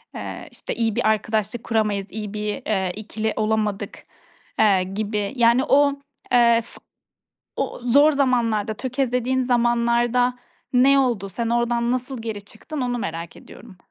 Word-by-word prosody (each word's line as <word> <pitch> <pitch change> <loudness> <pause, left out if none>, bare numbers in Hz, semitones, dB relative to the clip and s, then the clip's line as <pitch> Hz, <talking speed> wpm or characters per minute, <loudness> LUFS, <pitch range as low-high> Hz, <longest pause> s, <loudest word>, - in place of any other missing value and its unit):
eee, - - -7
işte - - -6
iyi 225 -2 0
bir - - +1
arkadaşlık 220 +1 -1
kuramayız, 210 -3 0
iyi 210 -1 -6
bir, 210 0 -2
eee, 190 -4 0
2'li 220 +1 -3
olamadık, 215 -2 -2 0.6
eee, 195 -4 +4
gibi. 205 +3 -3
Yani 235 +1 +4
o, 285 +1 +4 0.4
eee, 235 -1 +5
f - - -15 0.8
o - - -3
zor 285 +5 +5
zamanlarda, 235 -6 +1
tökezlediğin 255 +1 -1
zamanlarda 240 0 +2 0.4
ne 275 +2 +5
oldu? 230 -7 0
Sen 230 +4 -3
oradan 235 0 +1
nasıl 255 -1 -3
geri 220 -3 -5
çıktın, 280 +8 -7
onu 245 -1 -1
merak 165 -5 -5
ediyorum. 210 -6 -14
230 Hz, 140 wpm, -22 LUFS, 215-245 Hz, 0.8 s, eee